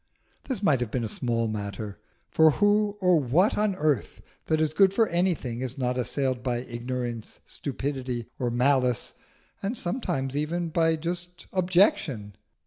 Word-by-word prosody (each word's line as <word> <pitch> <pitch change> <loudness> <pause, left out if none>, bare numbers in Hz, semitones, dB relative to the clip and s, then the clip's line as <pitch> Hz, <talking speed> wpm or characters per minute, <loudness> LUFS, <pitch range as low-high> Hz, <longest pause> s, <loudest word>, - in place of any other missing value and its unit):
This 250 -7 -3
might 145 -9 +4
have 120 -3 -2
been 120 +2 -2
a - - -1
small 115 +1 -1
matter; 105 -1 -5 0.3
for 160 0 +6
who 205 +2 +2
or 180 -3 +5
what 155 - +3
on 210 -2 +1
earth 150 -4 0 0.3
that 155 - +2
is 155 -1 +1
good 195 +2 +4
for 225 0 +4
anything 170 -9 0
is 130 +1 -3
not 125 -1 0
assailed 130 +1 -1
by 120 -1 -1
ignorance, 120 -2 -5
stupidity, 130 -3 -4
or 125 -2 0
malice 125 0 +1 0.5
and 205 +5 -2
sometimes 175 - -2
even 165 +3 -1
by 165 0 +2
just 175 +2 -4
objection? 175 - +2
140 Hz, 150 wpm, -27 LUFS, 120-175 Hz, 0.5 s, for